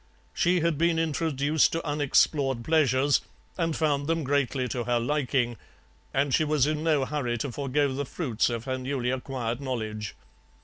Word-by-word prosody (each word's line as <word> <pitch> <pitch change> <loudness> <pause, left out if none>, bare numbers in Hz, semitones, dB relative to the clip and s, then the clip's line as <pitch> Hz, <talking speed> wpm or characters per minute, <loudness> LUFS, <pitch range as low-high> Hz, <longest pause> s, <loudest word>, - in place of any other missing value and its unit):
She 175 -1 +2
had 165 -2 0
been 170 0 +3
introduced 155 -2 +1
to 165 0 -2
unexplored 145 -3 +2
pleasures, 140 -2 +3 0.3
and 165 -3 -1
found 145 -3 0
them 165 0 0
greatly 135 -2 0
to 120 +1 -3
her 120 -1 +1
liking, 125 -2 0 0.5
and 135 0 +1
she 155 - +4
was 150 -3 +2
in 155 +1 -1
no 150 -5 +2
hurry 130 -5 -2
to 130 +3 -3
forgo 140 +1 0
the 140 +2 -2
fruits 125 -7 -1
of 115 -1 -3
her 130 0 -3
newly 130 -1 -2
acquired 125 -2 -3
knowledge. 110 -5 -4
140 Hz, 165 wpm, -27 LUFS, 125-155 Hz, 0.5 s, she